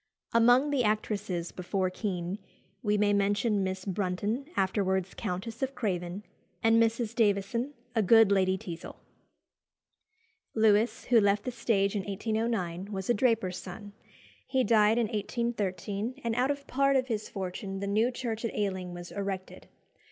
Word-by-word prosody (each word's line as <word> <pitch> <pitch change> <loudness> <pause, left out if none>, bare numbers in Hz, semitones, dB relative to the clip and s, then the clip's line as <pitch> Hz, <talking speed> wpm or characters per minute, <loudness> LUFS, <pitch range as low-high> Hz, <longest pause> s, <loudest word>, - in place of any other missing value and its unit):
Among 245 +5 +5
the 275 -4 +2
actresses 210 -5 -1
before 185 0 -1
Kean, 185 -1 -3 0.4
we 210 -3 +1
may 205 0 +3
mention 205 +1 +2
Miss 185 0 -3
Brunton, 205 +7 -2
afterwards 190 -1 0
Countess 205 +6 -5
of 265 0 -2
Craven, 185 -3 -2 0.4
and 225 0 +5
Mrs. 230 0 +1
Davison, 230 +4 +1 0.2
a 225 - +2
good 220 +1 +6
Lady 190 -1 +3
Teazle. 175 -2 -8 1.6
Lewis, 220 +1 +3
who 240 -2 +5
left 205 0 +2
the 255 - -3
stage 215 -4 +1
in 205 - 0
1809, 205 -3 -2
was 190 +2 -1
a - - +5
draper's 220 -6 +1
son. 200 +2 -9 0.5
He 260 -1 +2
died 220 -1 +4
in 235 - +3
1813, 215 0 -2
and 230 -1 0
out 250 +3 +2
of 285 -1 -2
part 275 +1 +2
of 260 -1 +3
his 220 -4 -3
fortune 195 0 -5
the 200 - -3
new 215 +4 +2
church 235 -3 -4
at 230 - -3
Ealing 190 -3 -2
was 175 0 -8
erected. 195 -2 -5
210 Hz, 150 wpm, -29 LUFS, 190-230 Hz, 1.6 s, good